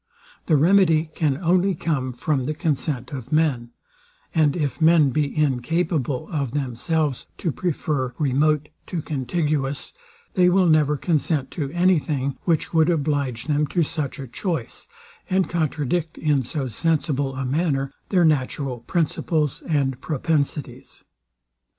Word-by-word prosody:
The 160 - +4
remedy 165 -1 +4
can 145 -4 0
only 180 +2 +3
come 140 -6 -1
from 130 +1 -1
the 155 +3 -2
consent 145 -5 -2
of 130 -2 -7
men; 145 -7 +1 0.6
and 155 -3 +3
if 150 -2 -2
men 160 -3 +5
be 150 +1 -1
incapable 150 0 0
of 140 -6 -2
themselves 145 +2 -1
to 170 - -1
prefer 145 -6 -2
remote 150 +1 +1 0.2
to 165 -4 -3
contiguous, 145 0 -2 0.4
they 180 -2 +4
will 185 +1 +4
never 150 -3 +3
consent 150 -4 0
to 145 -4 -3
any 175 0 +3
thing, 140 -3 -2
which 165 -2 0
would 160 0 +4
oblige 140 -7 0
them 150 0 +1
to 175 +2 +1
such 150 -2 -3
a 135 - -6
choice, 165 - -4 0.4
and 190 0 +2
contradict, 160 0 -1
in 150 -3 +2
so 135 +2 -3
sensible 145 +1 0
a 135 0 -3
manner, 135 -1 0 0.2
their 180 -4 +4
natural 135 -3 0
principles 160 +1 -1
and 135 -5 0
propensities. 150 -1 -2
150 Hz, 135 wpm, -23 LUFS, 135-165 Hz, 0.6 s, men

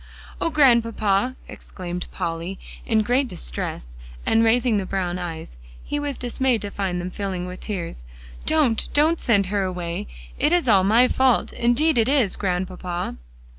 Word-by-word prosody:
"Oh, - - +2
Grandpapa!" 235 -5 +3
exclaimed 180 -1 -7
Polly, 170 +3 -4 0.3
in 220 -2 +3
great 255 +5 +2
distress, - - -5 0.3
and 225 0 +3
raising 230 0 +3
the 195 - -1
brown 180 -2 -2
eyes 160 - -6 0.2
he 290 - -3
was 290 -2 -3
dismayed 245 -2 0
to 205 - -5
find 190 -3 -2
them 180 +1 -4
filling 185 -2 -3
with 180 0 -7
tears 170 - -5 0.4
"don't, 285 -8 +2
don't 315 +3 +4
send 200 -4 +3
her 200 - +2
away! 180 - -3 0.3
It 305 - +3
is 350 -6 +2
all 200 -5 +5
my 225 +6 +5
fault; 260 -2 +2
indeed 240 +4 +2
it 225 +2 +3
is, 265 -9 +2
Grandpapa!" 180 - -3
205 Hz, 155 wpm, -23 LUFS, 180-250 Hz, 0.4 s, all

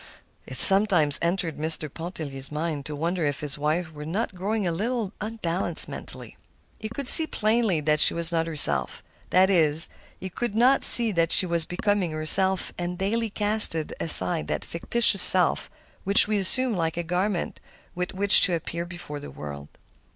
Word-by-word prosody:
It - - -8
sometimes 190 -7 +1
entered 170 -3 -4
Mr. 155 0 -3
Pontellier's 150 -6 -9
mind 150 -2 -5
to 150 - -8
wonder 170 +3 -4
if 145 -2 -3
his 145 -1 -4
wife 160 +3 -3
were 150 -1 -11
not 195 +8 -5
growing 200 +3 -4
a 175 - -2
little 215 +3 -5
unbalanced 210 -5 -4
mentally. - - -12 0.4
He 215 - -8
could 265 +3 -8
see 320 +4 +4
plainly 215 - -2
that 150 0 -1
she - - +6
was 170 0 +3
not 165 -1 -2
herself. 155 -3 +4 0.3
That 190 +1 +2
is, 160 -3 +1 0.3
he 190 - -9
could 240 +2 -6
not 255 +4 +1
see 235 -2 +6
that 165 -3 -2
she - - +6
was 170 -2 +1
becoming 195 +1 -3
herself 190 +5 -2
and 175 0 -6
daily 220 +4 -3
casting 205 -7 -1
aside 90 - +5
that 75 - -5
fictitious 195 +3 0
self 180 -3 +5 0.3
which 200 +2 +3
we 210 -1 -2
assume 250 +6 +4
like 165 -1 -4
a 175 - -4
garment 180 +2 -4 0.3
with 180 0 -6
which 200 +1 +6
to 180 - +3
appear 170 +1 -7
before 175 -4 -10
the 145 - -11
world. 70 -1 -11
175 Hz, 175 wpm, -23 LUFS, 160-205 Hz, 0.4 s, she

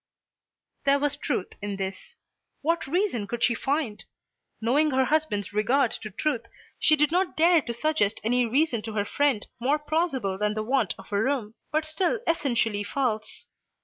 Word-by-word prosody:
There 280 0 +4
was 285 0 0
truth 270 -9 -2
in 205 0 -3
this. 190 -1 -6 0.5
What 330 -1 0
reason 335 - 0
could 235 +3 -3
she 235 - +4
find? 270 -4 -2 0.6
Knowing 275 +7 +3
her 265 -1 +2
husband's 255 -11 0
regard 240 +4 +2
to 215 - -5
truth 230 +2 -2 0.3
she 310 - +5
did 300 0 +2
not 360 +1 0
dare 335 +1 +5
to 240 - -5
suggest 235 -4 0
any 245 +3 +2
reason 255 -1 +1
to 220 0 -6
her 205 -1 0
friend 275 -3 +1
more 270 +5 +2
plausible 295 - -1
than 210 0 0
the 215 - -1
want 225 - +1
of 195 - -14
a 200 0 +1
room, 240 -4 -1 0.2
but 310 0 +1
still 355 +8 0
essentially 235 -10 +1
false. 220 -2 -2
255 Hz, 170 wpm, -26 LUFS, 215-305 Hz, 0.6 s, she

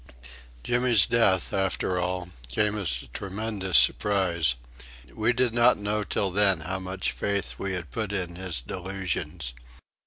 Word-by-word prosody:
Jimmy's 120 -3 +4
death, 100 -6 +2
after 95 -1 0
all, 90 0 -2 0.2
came 105 - +1
as 75 - -3
a - - -15
tremendous 100 -3 -1
surprise. 85 -1 +3 0.6
We 110 +1 +1
did 125 -1 +1
not 120 +1 +5
know 105 +1 -1
till 100 -1 -1
then 95 -3 +4
how 95 +4 -3
much 95 0 -2
faith 100 -1 -2
we 100 -1 -2
had 85 -8 -5
put 105 - -2
in 90 -4 -2
his 90 -7 -4
delusions. 90 -3 -4
95 Hz, 145 wpm, -26 LUFS, 90-105 Hz, 0.6 s, not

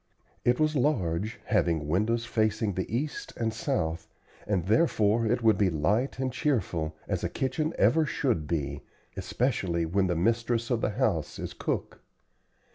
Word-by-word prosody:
It 120 0 +2
was 155 0 +2
large, 110 - 0
having 80 -4 +1
windows 110 +8 +1
facing 110 -2 0
the 95 +2 -3
east 140 +6 -3
and 115 -1 -1
south, 85 - -2 0.4
and 95 -5 0
therefore 110 - +3
it 120 +2 +1
would 110 -4 +4
be 100 -2 +4
light 100 - 0
and 130 -1 -2
cheerful, 90 - -1
as - - -2
a - - 0
kitchen 155 +4 -1
ever 160 -1 +4
should 120 - 0
be, 70 -4 -2 0.3
especially 95 -10 0
when 95 +3 +1
the 90 - 0
mistress 115 +5 +1
of 120 -2 +1
the - - +1
house 105 - -1
is - - -5
cook. - - -3
110 Hz, 155 wpm, -28 LUFS, 85-125 Hz, 0.4 s, would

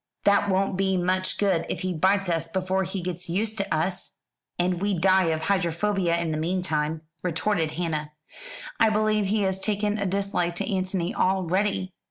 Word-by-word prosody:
"That 200 0 +4
won't 190 0 +1
be 190 -1 +1
much 185 +1 +1
good 190 -5 +2
if - - -3
he 185 0 -1
bites 195 +4 +2
us 165 -1 0
before 190 +2 -1
he 185 0 -4
gets 180 0 -5
used 215 +5 -1
to 195 - -2
us, 175 +4 -1 0.4
and 175 0 0
we 200 -2 +1
die 190 +2 +4
of 160 -1 0
hydrophobia 180 0 +1
in 170 -2 -1
the 155 - -1
meantime," 160 -3 -1 0.2
retorted 170 -2 0
Hannah; 155 -3 -3 0.7
"I 225 - +5
believe 215 -1 +2
he 210 +1 +1
has 190 0 0
taken 210 +1 0
a 200 - 0
dislike 185 -3 -1
to - - -2
Antony 185 0 -1
already." 185 +1 0
185 Hz, 175 wpm, -25 LUFS, 170-200 Hz, 0.7 s, I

